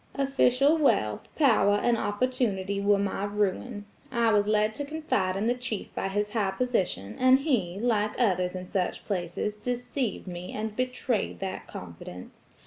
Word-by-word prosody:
"Official 275 +2 +3
wealth, 105 - +2
power 230 -8 +4
and 235 +3 +2
opportunity 205 -3 -1
were 200 0 +4
my 200 0 -1
ruin. 205 +2 -2 0.3
I 235 -3 +3
was 205 -1 +3
led 215 0 +2
to 285 - -4
confide 285 -11 -1
in 205 - -1
the 240 - +3
chief 245 -4 -4
by - - -2
his 205 +2 -1
high 210 -3 +1
position; 190 - -1
and 255 0 +6
he, 205 - 0
like 215 -2 0
others 185 -6 +2
in 185 0 -5
such 180 -1 -2
places, 180 +1 -2
deceived 245 +1 -3
me 180 -1 -7
and 215 0 -4
betrayed 250 -2 -1
that 190 -1 -4
confidence. 90 +1 -10
210 Hz, 155 wpm, -28 LUFS, 190-245 Hz, 0.3 s, and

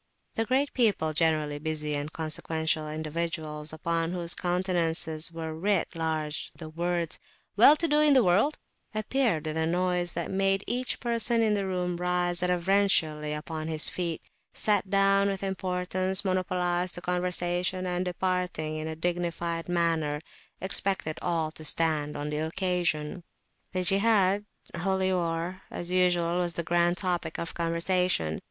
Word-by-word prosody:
The 225 - -1
great 270 +4 +1
people, 205 -10 +2
generally 155 -2 +1
busy 150 -1 -1
and 145 +1 -3
consequential 160 0 -1
individuals, 155 -1 -3
upon 165 +1 -1
whose 175 -1 +2
countenances 170 -3 0
were 160 -1 -5
writ 190 +3 0
large 160 -2 -3
the 160 -2 -8
words 170 0 -2 0.4
"well 240 +8 +8
to 335 +2 0
do 300 -1 +3
in 300 -1 +6
the 260 - +6
world," 210 +12 +3 0.4
appeared 215 - 0
with 155 0 -2
a 160 0 +1
noise 180 0 0
that 170 -1 -3
made 195 +1 +1
each 250 +1 -2
person 235 -1 +1
in 215 -1 +2
the 200 -2 -1
room 180 -1 -2
rise 180 0 0
reverentially 180 -4 +1
upon 155 +1 -4
his 155 -1 +2
feet; 170 -3 -3 0.3
sat 205 -2 +1
down 195 0 +3
with 195 0 -3
importance, 185 0 +1
monopolised 180 -1 0
the 175 - -6
conversation; 180 +1 -1
and, 180 0 -1
departing 180 -4 -2
in 155 0 -4
a 160 - -4
dignified 170 0 -2
manner, 165 -4 +1 0.4
expected 190 -3 0
all 165 -3 0
to 155 - -9
stand 155 -2 +1
on 145 +1 -4
the 150 - -2
occasion. 170 -1 -1 0.5
The 185 0 -1
Jihad 200 0 +4 0.3
(Holy 190 +2 0
War), 170 +1 -2
as 175 +1 -5
usual, 175 -2 +2
was 175 -1 -1
the 170 - -1
grand 175 +1 +2
topic 175 -3 -1
of 170 - -4
conversation. 170 - 0
175 Hz, 145 wpm, -28 LUFS, 160-185 Hz, 0.5 s, well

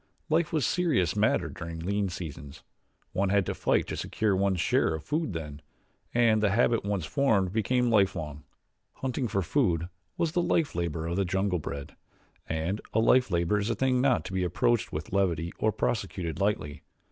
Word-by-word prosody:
Life 160 +1 +2
was 155 -6 +1
a - - +1
serious 155 - +1
matter - - +2
during 85 -1 -7
lean 100 +4 -1
seasons 80 -5 -8 0.5
one 95 +1 0
had 100 -1 +3
to - - -2
fight - - +1
to - - -4
secure 105 -3 0
one's 95 -1 +1
share 80 - +2
of 80 - -7
food 155 - -1
then, 75 -3 -6 0.5
and 115 -3 +3
the 105 - +3
habit 115 +2 +2
once 100 -5 -2
formed 100 - +1
became 120 +3 +1
lifelong. 85 -8 +1 0.5
Hunting 130 -1 -2
for 95 -2 -1
food 85 - +1 0.3
was 165 - 0
the 175 +1 +1
life 165 -3 +1
labor 85 -2 -2
of 85 +2 -2
the 100 - +2
jungle 95 0 0
bred, 70 -2 -6 0.5
and 80 +6 -2
a 110 - +3
life 125 +2 +4
labor 85 +3 +1
is 100 +3 -2
a 115 - 0
thing 130 +2 +2
not 130 -2 +2
to - - -6
be 95 -1 0
approached 120 +7 +1
with 75 +4 -5
levity 85 -4 0
nor 110 - +3
prosecuted 95 -8 -2
lightly. 100 -8 -1
100 Hz, 185 wpm, -28 LUFS, 85-120 Hz, 0.5 s, life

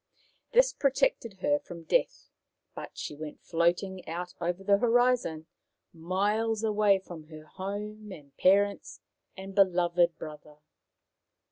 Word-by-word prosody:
This - - +4
protected 270 - 0
her 290 0 +2
from 175 - -10
death, - - 0 0.4
but - - -9
she - - -5
went 150 0 -9
floating 175 +2 0
out 175 +2 -5
over 175 +2 -2
the 200 0 +3
horizon, 240 -9 +2 0.5
miles 205 +6 0
away 210 -2 +3
from 175 -4 -10
her 155 -1 -11
home 205 +4 -6
and 145 -6 -12
parents 200 +2 +2 0.4
and 195 +1 -8
beloved 175 -3 +3
brother. 150 -1 -10
190 Hz, 120 wpm, -29 LUFS, 170-215 Hz, 0.5 s, This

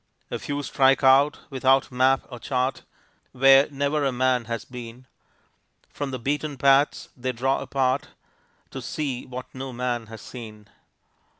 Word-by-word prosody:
A - - -3
few 145 0 -4
strike 135 0 +3
out, 135 +2 +5
without 135 0 +2
map 130 +2 +2
or 125 - -8
chart, 130 +1 -1 0.5
Where 135 +2 +6
never 145 +1 -1
a 135 - +1
man 125 -1 +1
has 115 -1 -4
been, 125 0 -10 0.9
From 145 -1 -4
the 130 - -4
beaten 145 +3 -2
paths 140 +2 +3
they 130 0 -2
draw 135 +3 0
apart 135 0 0 0.6
To - - -6
see 135 -5 -4
what 125 0 -8
no 130 0 -6
man 120 -2 -3
has 110 -1 -10
seen. 110 -4 -10
130 Hz, 145 wpm, -25 LUFS, 125-135 Hz, 0.9 s, Where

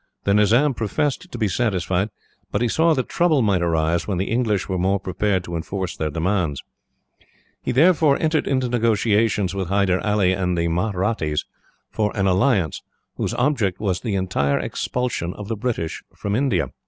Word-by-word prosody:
The 100 - +2
Nizam 115 +8 +4
professed 145 - -2
to - - -6
be 110 -2 +1
satisfied, 95 -2 0 0.4
but 100 - 0
he - - +2
saw 160 +7 +3
that 130 - -1
trouble 160 -7 +2
might 100 -4 +2
arise 85 0 0
when 100 -4 -1
the 95 +4 -2
English 115 -5 0
were 95 -2 -2
more 95 +2 +1
prepared 95 0 -1
to 85 -1 -6
enforce 95 +2 -4
their 80 - -2
demands. 80 -2 -1 1.0
He - - -2
therefore 155 +1 +4
entered 160 -1 +1
into 130 -2 +1
negotiations 110 -4 +1
with 95 -2 -3
Hyder 95 -1 +1
Ali 105 -3 +2
and 90 -1 -1
the 85 0 +1
Mahrattis 90 -3 -1 0.5
for 105 -1 0
an 95 - +1
alliance, 95 - +2 0.4
whose - - -2
object 120 -9 +1
was 95 -4 -1
the 110 -5 -2
entire 90 -7 0
expulsion 120 -9 -2
of 105 -1 -8
the 115 - -1
British 110 -8 -3
from 100 0 -2
India. 135 +1 +1
100 Hz, 170 wpm, -22 LUFS, 90-120 Hz, 1.0 s, Nizam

